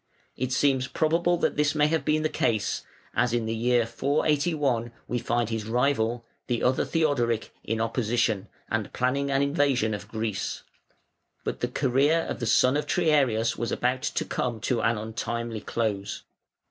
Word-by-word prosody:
It 130 0 -2
seems 135 -1 +2
probable 170 +4 +1
that - - 0
this 150 0 +2
may 150 -1 +4
have 160 +1 +1
been 155 0 +1
the - - +3
case, 110 -8 0 0.3
as 125 -1 +2
in 120 -2 0
the 110 - -1
year 120 +1 +2
481 140 -2 0 0.2
we 120 - -1
find 120 0 0
his 110 -1 -3
rival, 120 -1 +1 0.2
the 120 -2 -1
other 130 +1 +3
Theodoric, 130 -9 0
in 110 +1 -2
opposition, 115 -2 0 0.2
and 110 -2 -2
planning 140 +3 0
an 135 0 +2
invasion 140 -6 +2
of 105 0 -6
Greece. 110 -3 -3 0.8
But - - -3
the 125 - 0
career 140 +5 +2
of - - -4
the 120 - -2
son 130 +5 +4
of 150 - -2
Triarius 135 -10 +2
was 120 - -2
about 125 +1 0
to - - -1
come 120 -3 -2
to 120 0 0
an 115 +1 +2
untimely 115 +1 -4
close. 105 -4 -2
125 Hz, 165 wpm, -27 LUFS, 115-140 Hz, 0.8 s, may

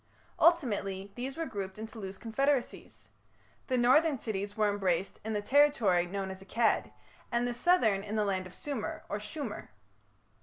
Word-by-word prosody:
Ultimately 205 - +2
these 265 +3 -5
were 330 - -1
grouped 195 -6 -5
into 220 +1 -8
loose 190 -1 -6
confederacies. 270 +3 -1 0.6
The 255 - +1
northern 275 +5 +4
cities 205 -3 -4
were 215 -1 +3
embraced 190 -2 -1
in 220 +1 -3
the 205 -1 -1
territory 230 -10 +4
known 190 +1 -3
as 190 0 -9
Akkad, 220 +4 +1 0.4
and 240 0 +1
the 245 - -2
southern 235 - +3
in 210 +1 -5
the 210 -1 +2
land 190 -2 -1
of 185 - -15
Sumer, 275 -7 -4
or 205 - -2
Shumer. 225 +1 -6
215 Hz, 160 wpm, -31 LUFS, 195-255 Hz, 0.6 s, northern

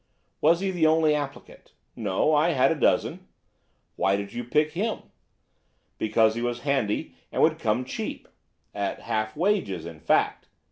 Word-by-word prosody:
"Was 165 +3 +4
he 195 -1 0
the 170 -4 +2
only 155 -1 +4
applicant?" 145 -2 -6 0.2
"No, 110 +7 +1
I 155 +3 +3
had 135 +2 +3
a - - +1
dozen." - - +1 0.7
"Why 95 - +2
did 100 0 -5
you 120 - -4
pick 150 +5 +1
him?" 210 +8 -2 1.0
"Because 110 0 +3
he 115 - -4
was 120 0 -2
handy 135 -7 -1 0.2
and - - -3
would - - +3
come 115 +4 0
cheap." - - -5 0.5
"At 100 -1 -3
half 110 0 -2
wages, 170 - 0
in 85 -2 -9
fact." - - +1
125 Hz, 155 wpm, -26 LUFS, 110-155 Hz, 1.0 s, Was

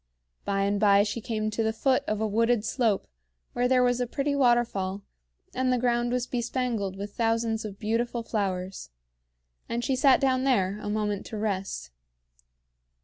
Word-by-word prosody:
By 195 0 0
and 200 +1 +1
by 200 -1 +5
she 215 +2 -3
came 215 -1 -2
to 215 - -1
the 220 0 +1
foot 255 +4 +1
of 215 -1 -1
a 220 - 0
wooded 230 +1 +1
slope 225 -6 +1 0.5
where 245 +1 +1
there 255 0 +4
was 245 0 +2
a 245 - 0
pretty 280 +3 -1
waterfall 235 -7 +1 0.5
and 255 0 +1
the 250 - +2
ground 240 0 +1
was 250 -1 0
bespangled 240 -5 -2
with 200 +1 -6
thousands 225 -1 0
of 200 -2 -7
beautiful 230 +2 -1
flowers; 190 - -3 0.8
and 235 +1 -2
she 265 - +1
sat 260 0 +5
down 260 -2 +2
there 205 -7 +1
a 210 - -5
moment 210 -1 -2
to 220 - -6
rest. 195 - -3
225 Hz, 170 wpm, -27 LUFS, 205-245 Hz, 0.8 s, by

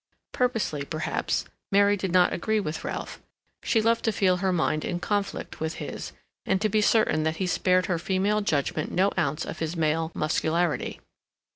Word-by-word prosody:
Purposely, 225 - 0
perhaps, 155 +3 -2 0.3
Mary 200 +1 +5
did 190 -2 -3
not 180 0 +4
agree 220 +4 0
with 160 -6 -4
Ralph; - - -5 0.4
she 225 -2 +1
loved 230 +1 +2
to 225 - +3
feel 185 -3 +2
her 190 +1 0
mind 155 -3 0
in 175 - -2
conflict 205 +1 -2
with 160 +1 -2
his, - - -6 0.3
and 190 - +1
to 215 +1 +1
be 215 +1 +2
certain 210 -7 +3
that 160 +1 0
he 190 - -1
spared 185 0 +2
her 175 -3 -1
female 195 +4 +1
judgment 155 -4 -1
no 195 +2 +2
ounce 150 +3 0
of 160 - -6
his 160 +1 -2
male 160 +1 +1
muscularity. 160 +2 0
180 Hz, 175 wpm, -26 LUFS, 160-205 Hz, 0.4 s, Mary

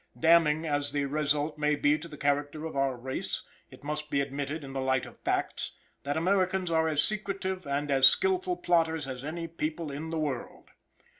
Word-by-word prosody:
Damning 160 -1 +4
as 145 -2 -1
the 145 -1 +1
result 150 +1 0
must 150 -1 +1
be 145 +1 +5
to 155 +2 -6
the 150 -2 -10
character 145 +2 0
of 160 - -6
our 135 -1 +1
race, 130 +2 -4 0.3
it - - -15
must 150 +1 -4
be 140 - +1
admitted, 140 +2 -3
in 135 -1 -8
the 135 - -2
light 130 0 +1
of - - -13
facts, - - -1 0.3
that 145 +2 -2
Americans 185 +1 +1
are 160 0 +3
as 150 -2 +2
secretive 195 -4 -3
and 140 +1 -1
as 135 -1 +8
skillful 370 -2 +2
plotters 160 -4 +1
as 130 -1 -6
any 165 +3 -4
people 160 -1 -3
in 150 +3 -5
the 165 - -2
world. 145 -6 -4
150 Hz, 195 wpm, -29 LUFS, 140-165 Hz, 0.3 s, as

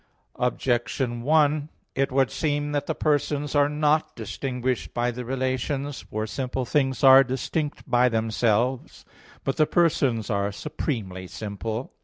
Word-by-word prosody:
Objection 120 0 0
1: 150 +1 +2 0.2
It 135 0 0
would 135 0 +2
seem 145 -1 -1
that 145 -1 -1
the - - -1
persons 145 -1 0
are 145 -1 +4
not 150 +1 +1
distinguished 125 +2 -3
by 120 +1 +1
the 125 +1 -6
relations. 130 +2 -2
For 110 0 -2
simple 130 +2 -3
things 135 0 0
are 135 0 +9
distinct 140 +4 -3
by 125 +1 +4
themselves. 115 +2 0 0.4
But 135 - -1
the 155 - +4
persons 135 -10 +1
are 100 0 0
supremely 100 - -4
simple. 110 +4 -5
130 Hz, 135 wpm, -25 LUFS, 120-145 Hz, 0.4 s, are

